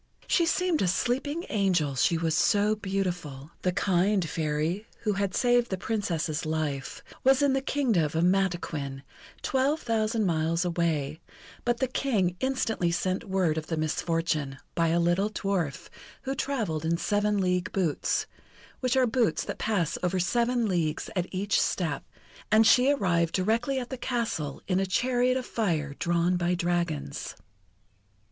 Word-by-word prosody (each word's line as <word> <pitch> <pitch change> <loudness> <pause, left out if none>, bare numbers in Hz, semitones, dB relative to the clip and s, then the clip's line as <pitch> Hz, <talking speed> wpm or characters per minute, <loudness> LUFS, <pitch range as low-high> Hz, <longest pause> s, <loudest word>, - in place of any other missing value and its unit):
She 340 -2 +2
seemed 360 -1 +1
a 190 - +2
sleeping 265 - -1
angel, 180 -9 +1
she 165 +6 +2
was 160 -1 0
so 205 +5 +3
beautiful. 180 -8 -3
The 180 - +1
kind 190 0 +1
Fairy, 160 +7 -2
who 210 -2 0
had 200 -1 -1
saved 245 -1 +3
the 190 - -2
Princess's 170 -7 -2
life, 155 -4 -3 0.2
was 270 +1 +4
in 280 -2 +3
the 270 - +1
Kingdom 250 - +1
of 150 - -4
Mataquin, 175 -7 0 0.4
twelve 275 +4 +1
thousand 225 -2 0
miles 165 0 +1
away, 160 -4 -1 0.5
but 240 0 +2
the 260 - 0
King 215 -9 0
instantly 240 -9 0
sent 185 +5 -1
word 180 -5 +1
of 155 - -9
the 160 - -2
misfortune, 155 -3 -1 0.2
by 165 -1 +2
a 165 +1 +2
little 175 +4 +2
dwarf, 195 -9 -2 0.4
who 270 0 -2
travelled 225 - -2
in 165 +1 +1
seven 205 +2 +1
league 180 0 0
boots 175 -7 0 0.5
which 255 0 +1
are 260 - +5
boots 235 -1 +1
that - - -6
pass 200 -8 0
over 180 +1 0
seven 235 +5 +1
leagues 170 -5 -1
at 180 -1 0
each 195 +2 +1
step 160 -7 -1 0.5
and 220 +1 +6
she 250 +4 +6
arrived 175 - +1
directly 230 +8 +1
at 250 0 -4
the 260 - -3
castle, 230 - -2
in 185 -1 +1
a 195 - +1
chariot 250 +5 +2
of 255 - -4
fire 160 -10 -1
drawn 175 +1 +1
by 175 0 +1
dragons. 170 - -2
185 Hz, 155 wpm, -28 LUFS, 165-230 Hz, 0.5 s, and